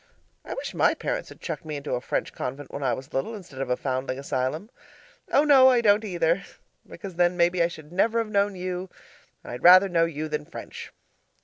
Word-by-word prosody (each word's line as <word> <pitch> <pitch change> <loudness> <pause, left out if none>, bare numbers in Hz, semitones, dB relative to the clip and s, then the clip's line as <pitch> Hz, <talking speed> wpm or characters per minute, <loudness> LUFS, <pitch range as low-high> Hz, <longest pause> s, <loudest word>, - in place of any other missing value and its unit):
I - - -6
wish - - -5
my - - +3
parents - - -3
had - - -13
chucked - - -5
me 155 -1 -5
into 140 -1 -4
a 125 - -1
French - - -3
convent 135 +2 -6
when 140 - -6
I 130 -3 +1
was 130 +1 -11
little 175 +13 -2
instead 175 -10 -9
of 135 - -3
a 125 - +1
foundling 130 -1 -3
asylum. 140 - -3 0.6
Oh 285 - +5
no, 275 -3 +7
I 250 -2 +4
don't 210 -1 +4
either! 175 -2 0 0.5
Because 190 -4 -9
then 175 0 +2
maybe 175 0 +2
I 170 - +4
should 155 -3 -11
never 220 +6 +1
have 225 -2 0
known 200 -1 +1
you. 180 0 -4 0.5
I'd 120 - -7
rather 185 +2 +8
know 170 -3 +2
you 155 -1 -4
than 150 -1 -3
French. - - -9
170 Hz, 210 wpm, -25 LUFS, 140-195 Hz, 0.6 s, rather